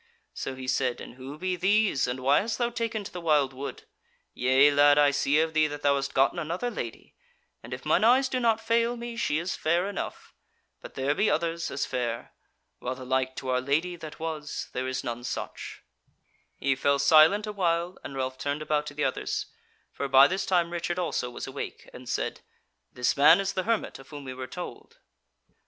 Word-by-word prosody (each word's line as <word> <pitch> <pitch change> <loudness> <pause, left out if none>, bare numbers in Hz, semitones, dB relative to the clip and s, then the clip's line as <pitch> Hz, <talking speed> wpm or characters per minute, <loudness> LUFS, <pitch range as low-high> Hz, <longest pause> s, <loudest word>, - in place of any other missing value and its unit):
So 135 - -5
he 130 0 -8
said: 130 -1 0
"And - - -9
who 130 +3 -9
be 185 +2 -1
these, 195 -6 +2
and 125 +1 -3
why 140 +3 +4
hast 215 +1 -3
thou 240 0 0
taken 230 -2 -2
to - - -8
the 180 - -6
wildwood? 140 -4 0 0.5
Yea 130 +3 +4
lad, 145 0 +5
I 145 -1 +5
see 140 +1 +2
of 160 0 +1
thee, 155 0 +4
that 145 0 -7
thou 140 - +4
hast 140 0 -2
gotten 135 +6 +3
another 170 +9 -2
Lady; 120 - -7 0.5
and 120 - -12
if 125 +3 -6
mine 155 - +3
eyes 255 +4 +5
do 255 0 -1
not 230 -2 +2
fail 230 +1 +1
me 235 0 -6
she 195 -10 0
is 170 +3 -2
fair 170 +4 +1
enough. 200 -1 -6 0.5
But - - -11
there 135 +2 +1
be 205 +8 +2
others 165 +1 -1
as 140 - -2
fair; 120 -2 -3 0.5
while 130 +1 -3
the 130 0 -9
like 130 0 0
to 130 - -5
our 125 0 +1
Lady 155 +7 0
that 155 -2 -10
was, 155 -2 -4
there 130 +1 -2
is 130 0 -3
none 120 0 -4
such." - - -6 0.7
He 135 0 0
fell 140 +1 +2
silent 155 +9 +6
a 210 - -5
while, 175 -2 0
and 135 - -7
Ralph 130 0 -3
turned 145 +2 -2
about 150 -1 0
to 145 - -8
the 150 - -1
others, - - -1 0.5
for 140 - -3
by 135 0 +8
this 190 +6 -1
time 175 -2 +2
Richard 175 0 -2
also 165 -8 -1
was 120 - -6
awake, 135 +1 -7
and 125 -1 -10
said: - - -2 0.5
"This 125 0 0
man 150 +6 +7
is 195 0 -1
the 185 - -2
hermit 230 -9 -1
of 135 - -15
whom 145 -2 -8
we 130 -1 -6
were 130 0 -6
told." 180 - -8
150 Hz, 210 wpm, -27 LUFS, 130-180 Hz, 0.7 s, by